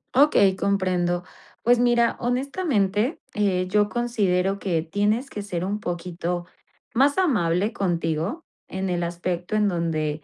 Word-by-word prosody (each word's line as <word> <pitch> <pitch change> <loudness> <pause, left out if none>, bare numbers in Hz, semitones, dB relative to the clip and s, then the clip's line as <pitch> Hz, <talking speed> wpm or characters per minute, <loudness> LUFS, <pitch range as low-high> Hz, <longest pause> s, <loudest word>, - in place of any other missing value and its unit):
Okey, 255 -9 +5
comprendo. 180 -3 0 0.4
Pues 245 +1 +4
mira, 240 -1 +3
honestamente, 245 - 0 0.2
eh, 185 -3 +1
yo 205 +2 +2
considero 200 -6 0
que 175 -5 -1
tienes 210 - 0
que 205 - -6
ser 180 -4 -3
un 200 +3 -2
poquito 175 -1 -4 0.5
más 280 +6 +4
amable 205 - +1
contigo 170 - -1 0.2
en 190 0 -3
el 175 -1 -1
aspecto 175 +3 -3
en 210 -1 +3
donde 155 -4 -1
195 Hz, 130 wpm, -24 LUFS, 175-230 Hz, 0.5 s, Okey